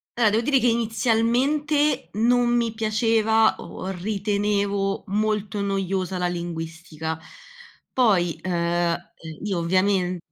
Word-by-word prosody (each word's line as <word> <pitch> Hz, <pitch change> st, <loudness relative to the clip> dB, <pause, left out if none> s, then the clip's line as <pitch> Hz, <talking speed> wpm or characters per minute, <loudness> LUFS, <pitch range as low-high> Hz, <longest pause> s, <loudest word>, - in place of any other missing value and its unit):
Allora, 230 Hz, -3 st, +4 dB
devo 225 Hz, +2 st, +2 dB
dire 270 Hz, 0 st, +3 dB
che 245 Hz, -, +2 dB
inizialmente 245 Hz, +6 st, +1 dB
non 240 Hz, +3 st, +3 dB
mi 230 Hz, -2 st, 0 dB
piaceva 220 Hz, 0 st, +2 dB
o 185 Hz, -, -8 dB
ritenevo 200 Hz, 0 st, -1 dB
molto 210 Hz, 0 st, -1 dB
noiosa 195 Hz, -1 st, -1 dB
la 180 Hz, 0 st, 0 dB
linguistica. 165 Hz, -2 st, -5 dB, 0.7 s
Poi, 180 Hz, -10 st, +2 dB
uhm, 185 Hz, -, -2 dB
eh 170 Hz, 0 st, -1 dB, 0.3 s
io 195 Hz, -4 st, -1 dB
ovviamen 185 Hz, +1 st, +1 dB
205 Hz, 110 wpm, -24 LUFS, 180-225 Hz, 0.7 s, Allora